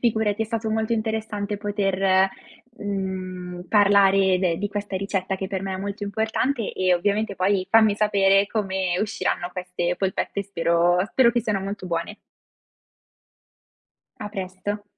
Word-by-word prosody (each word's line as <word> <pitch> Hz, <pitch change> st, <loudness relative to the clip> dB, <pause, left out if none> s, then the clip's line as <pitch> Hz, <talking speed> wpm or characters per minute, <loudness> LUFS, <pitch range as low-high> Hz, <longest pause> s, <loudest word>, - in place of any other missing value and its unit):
Figurati, 220 Hz, -2 st, +1 dB
è -, -, -1 dB
stato 225 Hz, 0 st, -3 dB
molto 220 Hz, +1 st, 0 dB
interessante 220 Hz, -2 st, -2 dB
poter, 195 Hz, -2 st, +2 dB, 0.5 s
mhmm, 185 Hz, -3 st, -4 dB
parlare 195 Hz, -2 st, +4 dB
de 180 Hz, -3 st, +1 dB
di 205 Hz, -, -2 dB
questa 205 Hz, -1 st, -4 dB
ricetta 195 Hz, -1 st, -2 dB
che 190 Hz, -, -4 dB
per 190 Hz, -1 st, -4 dB
me 190 Hz, -1 st, -3 dB
è -, -, -3 dB
molto 200 Hz, +2 st, -5 dB
importante 220 Hz, +4 st, -1 dB
e 185 Hz, -1 st, +2 dB
ovviamente 205 Hz, +3 st, 0 dB
poi 185 Hz, 0 st, +1 dB
fammi 220 Hz, -2 st, +5 dB
sapere 200 Hz, -1 st, +3 dB
come 190 Hz, -4 st, -1 dB
usciranno 205 Hz, -4 st, -2 dB
queste 180 Hz, -1 st, -2 dB
polpette, 195 Hz, +1 st, -2 dB
spero 175 Hz, -2 st, +2 dB
spero 240 Hz, +1 st, +4 dB
che 240 Hz, -, 0 dB
siano 210 Hz, -4 st, -1 dB
molto 195 Hz, -1 st, -5 dB
buone. 170 Hz, +4 st, -3 dB, 2.0 s
A 210 Hz, -, -4 dB
presto. 195 Hz, +1 st, -5 dB
200 Hz, 140 wpm, -24 LUFS, 185-210 Hz, 2.0 s, fammi